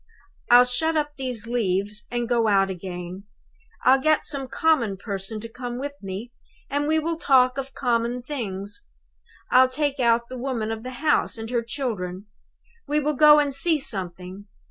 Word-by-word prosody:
I'll 245 Hz, +1 st, +8 dB
shut 320 Hz, +6 st, 0 dB
up 295 Hz, -1 st, 0 dB
these 250 Hz, -5 st, -5 dB
leaves 210 Hz, -3 st, -1 dB
and 240 Hz, -1 st, -2 dB
go 235 Hz, -2 st, +2 dB
out 195 Hz, -2 st, +3 dB
again. 180 Hz, +1 st, -7 dB, 0.6 s
I'll 265 Hz, +1 st, +5 dB
get 310 Hz, +2 st, +2 dB
some 275 Hz, -3 st, -4 dB
common 255 Hz, -11 st, +1 dB
person 200 Hz, +1 st, -5 dB
to 230 Hz, -, -6 dB
come 245 Hz, +1 st, -6 dB
with 285 Hz, +3 st, -4 dB
me, 195 Hz, +5 st, -6 dB, 0.4 s
and 290 Hz, +1 st, 0 dB
we 315 Hz, +1 st, +2 dB
will 325 Hz, +1 st, -1 dB
talk 260 Hz, -4 st, +3 dB
of 270 Hz, 0 st, -7 dB
common 240 Hz, -1 st, 0 dB
things. 210 Hz, -, -5 dB, 0.7 s
I'll 255 Hz, 0 st, +6 dB
take 285 Hz, +1 st, -1 dB
out 235 Hz, -1 st, +2 dB
the 255 Hz, 0 st, -7 dB
woman 240 Hz, -4 st, -2 dB
of 220 Hz, -1 st, -4 dB
the 250 Hz, -, -6 dB, 0.2 s
house, 300 Hz, -, +2 dB
and 225 Hz, +1 st, -6 dB
her 240 Hz, -2 st, +1 dB
children. 215 Hz, -7 st, -4 dB, 0.6 s
We 295 Hz, +1 st, +1 dB
will 300 Hz, +1 st, 0 dB
go 300 Hz, +1 st, +7 dB
and 290 Hz, -2 st, +2 dB
see 320 Hz, +4 st, +2 dB
something. 190 Hz, -5 st, -5 dB
245 Hz, 170 wpm, -24 LUFS, 205-275 Hz, 0.7 s, I'll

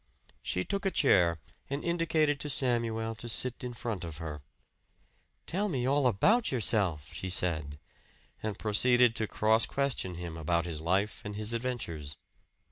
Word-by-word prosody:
She 90 Hz, -, -2 dB
took 200 Hz, 0 st, -2 dB
a 195 Hz, -, +2 dB
chair 90 Hz, -, +4 dB, 0.3 s
and 140 Hz, +2 st, -3 dB
indicated 160 Hz, -4 st, +1 dB
to 150 Hz, -, -3 dB
Samuel 115 Hz, -4 st, +1 dB
to 115 Hz, +2 st, -8 dB
sit 125 Hz, +2 st, -1 dB
in 125 Hz, -1 st, -5 dB
front 115 Hz, -6 st, -4 dB
of 80 Hz, -3 st, -6 dB
her. 75 Hz, -3 st, -6 dB, 1.0 s
"Tell 205 Hz, +4 st, -1 dB
me 130 Hz, -7 st, -1 dB
all 140 Hz, 0 st, +3 dB
about 205 Hz, -, +3 dB
yourself," 100 Hz, -, 0 dB
she 95 Hz, -, -4 dB
said; 80 Hz, -5 st, +1 dB, 0.6 s
and 105 Hz, -2 st, -3 dB
proceeded 120 Hz, +2 st, +3 dB
to 110 Hz, -, -1 dB
cross 110 Hz, +2 st, +2 dB
question 135 Hz, -10 st, -1 dB
him 85 Hz, -1 st, -6 dB
about 85 Hz, +1 st, 0 dB
his 80 Hz, -3 st, -5 dB
life 95 Hz, +7 st, 0 dB
and 105 Hz, -1 st, -6 dB
his 105 Hz, +2 st, -3 dB
adventures. 90 Hz, -, -4 dB
110 Hz, 155 wpm, -30 LUFS, 90-130 Hz, 1.0 s, chair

